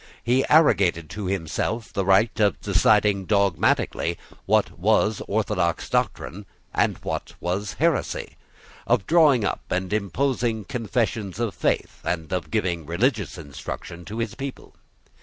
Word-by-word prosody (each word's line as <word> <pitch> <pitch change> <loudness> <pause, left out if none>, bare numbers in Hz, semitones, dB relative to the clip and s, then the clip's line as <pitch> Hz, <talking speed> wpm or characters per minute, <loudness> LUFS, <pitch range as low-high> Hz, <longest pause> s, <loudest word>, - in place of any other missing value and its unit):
He 125 +3 +3
arrogated 95 - +4
to 100 +1 -4
himself 100 +5 -2
the 100 - 0
right 100 +4 +3
of 105 -2 +2
deciding 100 0 +3
dogmatically 95 -3 +1 0.3
what - - +2
was 110 +2 +2
orthodox - - -1
doctrine 100 +2 -2 0.3
and - - +1
what - - -4
was 95 +4 -2
heresy, 165 -2 -1 0.5
of - - +2
drawing 150 -9 +5
up - - -1
and 90 +2 -1
imposing 115 +1 0
confessions 115 -5 -2
of 115 -4 -1
faith, - - -1
and 85 -1 -3
of 90 -3 -2
giving 90 -8 -1
religious 100 - 0
instruction 80 +3 -7
to 110 - -7
his 115 -2 -2
people. 135 -1 -7
105 Hz, 130 wpm, -24 LUFS, 90-115 Hz, 0.5 s, drawing